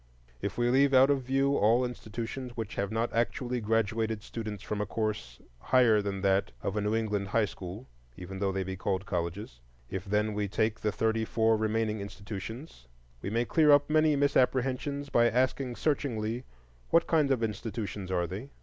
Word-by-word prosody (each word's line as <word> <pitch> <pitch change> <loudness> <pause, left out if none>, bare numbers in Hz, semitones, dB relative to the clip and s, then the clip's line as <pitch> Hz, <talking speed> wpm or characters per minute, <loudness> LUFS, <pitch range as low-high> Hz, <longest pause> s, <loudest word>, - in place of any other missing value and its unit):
If - - -3
we 120 0 +2
leave 135 +1 +4
out 135 +2 +7
of 140 -2 +1
view 135 +2 +1
all 115 +4 +4
institutions 120 +1 -6
which 110 -3 -4
have 100 +1 -2
not 115 +2 -1
actually 120 +1 -1
graduated 110 0 0
students 105 -5 -6
from 105 -1 -3
a - - 0
course 100 - -3 0.2
higher 115 - +4
than 100 -1 -3
that 95 0 +2
of 100 - -2
a 105 - 0
New 105 +2 0
England 105 -3 -1
high 110 +2 +2
school, 100 +5 -8 0.3
even 95 +1 -7
though 100 -1 +1
they 95 0 -1
be 95 0 -5
called 95 0 -2
colleges; 85 - -4 0.3
if 95 0 -4
then 105 +1 0
we 105 0 -1
take 110 +2 0
the 105 - 0
thirty 110 +1 0
four 110 0 +2
remaining 110 0 0
institutions, 100 - -8 0.3
we - - -3
may 115 +3 0
clear 155 +4 +3
up 145 +1 +5
many 155 -1 +4
misapprehensions 140 0 +1
by 120 -2 +4
asking 125 +1 0
searchingly, 120 -4 -1 0.4
What 165 0 +4
kind 155 -4 +2
of 130 -4 +1
institutions 105 -3 -4
are 90 -2 +1
they? 100 +10 -6
110 Hz, 180 wpm, -29 LUFS, 100-125 Hz, 0.4 s, out